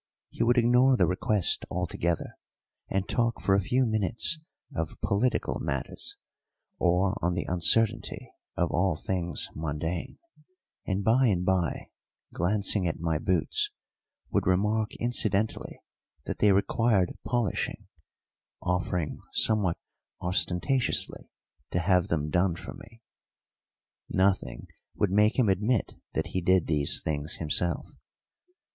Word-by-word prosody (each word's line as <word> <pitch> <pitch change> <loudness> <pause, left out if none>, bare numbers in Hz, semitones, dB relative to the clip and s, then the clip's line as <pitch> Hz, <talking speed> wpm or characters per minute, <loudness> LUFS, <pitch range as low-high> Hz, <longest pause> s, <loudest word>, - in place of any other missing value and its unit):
He - - -6
would 120 +2 +3
ignore 125 +2 +5
the - - +4
request 95 +1 0
altogether, 85 -1 -2 0.5
and 95 0 -1
talk 115 -1 0
for 95 - +1
a 100 - +5
few 125 +7 +1
minutes 110 - 0 0.4
of 80 -1 -4
political 115 +6 0
matters, - - -5 0.6
or 90 +3 +2
on 85 0 0
the 90 - -2
uncertainty 95 +5 +2 0.3
of 85 - +1
all 90 -1 +1
things 90 +2 -2
mundane, 80 +2 -4 0.7
and 95 0 -1
by 120 +5 +4
and 90 -4 +1
by, 90 -3 0 0.4
glancing 100 +1 +1
at 85 - -3
my 80 -2 0
boots, 85 -1 +1 0.6
would - - +1
remark 105 +4 +1
incidentally 110 -3 -1 0.4
that - - -4
they 105 - +5
required 100 0 +2
polishing, 120 -6 -2 0.7
offering 90 -2 -2
somewhat 105 -6 +2 0.4
ostentatiously 90 +8 0 0.4
to - - -2
have 90 0 +2
them 75 -2 -1
done 90 0 +2
for - - -8
me. 115 +1 -15 1.1
Nothing 95 -10 0 0.3
would 100 - +1
make 105 +3 +3
him 125 -4 +3
admit 105 +4 +1 0.2
that - - -2
he 95 - 0
did 95 0 +3
these 75 -2 +1
things 75 0 -3
himself. 85 +2 -1
95 Hz, 120 wpm, -28 LUFS, 85-110 Hz, 1.1 s, ignore